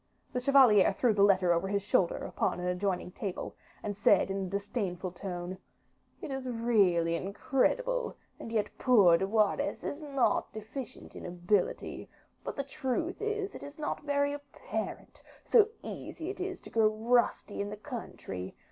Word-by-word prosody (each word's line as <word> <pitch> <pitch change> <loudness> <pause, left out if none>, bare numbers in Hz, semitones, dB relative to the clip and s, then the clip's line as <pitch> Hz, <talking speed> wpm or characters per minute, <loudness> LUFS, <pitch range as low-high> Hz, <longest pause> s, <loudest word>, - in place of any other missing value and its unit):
The 250 - 0
chevalier 250 -6 +6
threw 235 +3 +2
the 205 - +1
letter 185 -3 +5
over 170 +3 0
his 200 0 0
shoulder 190 -3 +2
upon - - -2
an 180 - -3
adjoining 180 0 -1
table, 190 0 -5 0.3
and 205 -1 -3
said 200 -1 +4
in 195 0 -2
a - - -6
disdainful 195 -2 -3
tone, 180 0 -5 0.6
"It - - -4
is 265 -1 -4
really 200 -8 +3
incredible; 315 - 0 0.2
and 225 - -7
yet 215 -2 -1
poor 195 -9 +6
De 190 - 0
Wardes 220 +7 +1
is 290 - -4
not 275 -4 +1
deficient 220 +4 -8
in - - -8
ability; 180 +2 -1 0.3
but - - -4
the 280 - -2
truth 300 - -3
is, 425 -2 -2
it - - -9
is 285 +1 -9
not 305 0 -3
very 285 -1 +1
apparent, 285 -1 -6 0.2
so 435 -4 +6 0.2
easy 335 +3 -6
is 400 - -10 0.2
it - - -31
to - - -11
grow 225 -1 +4
rusty 225 -1 +1
in 200 - -3
the 210 - -6
country. 205 - -7
215 Hz, 165 wpm, -31 LUFS, 190-275 Hz, 0.6 s, chevalier